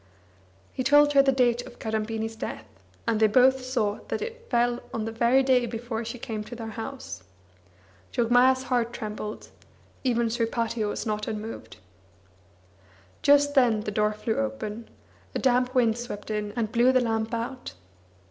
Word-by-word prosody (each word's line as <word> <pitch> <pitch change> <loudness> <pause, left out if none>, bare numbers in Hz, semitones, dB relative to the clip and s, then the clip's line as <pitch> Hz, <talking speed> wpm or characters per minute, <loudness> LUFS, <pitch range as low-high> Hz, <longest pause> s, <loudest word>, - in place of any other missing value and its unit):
He 255 - -2
told 290 +2 +5
her 275 - +7
the 275 0 +3
date 245 -2 +2
of - - -13
Kadambini's 220 0 -3
death, 110 - -6 0.4
and 225 -2 +1
they 220 - +6
both 255 +4 +4
saw 230 -5 -1
that - - -2
it 470 +1 -7
fell 240 0 +2
on 220 - -3
the 225 - -3
very 235 +4 +3
day 255 -2 +3
before 230 0 -4
she 230 +2 -6
came 220 -3 -5
to 240 - -8
their 225 -1 -6
house. 225 - -7 0.9
Jogmaya's 250 +2 +4
heart 240 -2 0
trembled, 215 -2 -6 0.5
even 235 -3 +1
Sripati 230 -1 -1
was 205 - -3
not 210 -1 -2
unmoved. 220 0 -6 1.4
Just 285 0 +5
then 240 -6 +4
the 210 - -4
door 210 +1 +1
flew 220 +1 -2
open; 205 - -4 0.5
a - - +2
damp 250 0 +2
wind 235 -2 +3
swept 215 -3 -6
in 210 -1 -2
and 225 -3 -1
blew 240 +3 +4
the 260 - +4
lamp 225 -2 -1
out. 240 - -5
235 Hz, 160 wpm, -26 LUFS, 220-255 Hz, 1.4 s, her